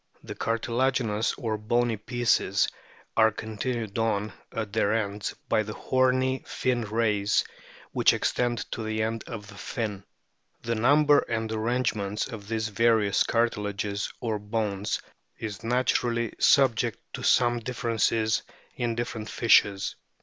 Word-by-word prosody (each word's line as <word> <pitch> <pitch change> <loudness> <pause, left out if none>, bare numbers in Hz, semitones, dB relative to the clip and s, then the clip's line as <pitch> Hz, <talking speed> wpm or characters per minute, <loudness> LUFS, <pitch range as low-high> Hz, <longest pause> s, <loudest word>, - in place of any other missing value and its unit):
The - - -6
cartilaginous, 115 -1 0
or 110 -5 -3
bony 120 +2 +1
pieces, 120 +2 +1 0.5
are 110 -1 +6
continued 110 0 -4
on 105 -2 0 0.2
at 110 -3 -4
their 100 - +2
ends 105 -2 -2
by 110 - +3
the 105 0 -6
horny 130 0 +1
fin 125 -2 0
rays 105 -2 +1 0.5
which - - +4
extend 120 -2 0
to - - -3
the 110 0 -1
end 115 0 -2
of 110 -4 -6
the 105 - -12
fin. 100 -1 -4 0.6
The 115 - -1
number 145 +5 +5
and 110 -1 -1
arrangements 110 -2 -1
of 110 -5 -8
these 110 0 -1
various 110 -1 +3
cartilages 105 -3 -1
or 110 -3 -2
bones 105 -1 -2 0.4
is 110 -1 -6
naturally 120 -1 +1
subject 120 -5 +4 0.2
to - - -5
some 120 -1 +3
differences 115 -2 0 0.3
in 120 -1 -1
different 115 -2 -4
fishes. 100 -4 +3
115 Hz, 130 wpm, -27 LUFS, 105-120 Hz, 0.6 s, are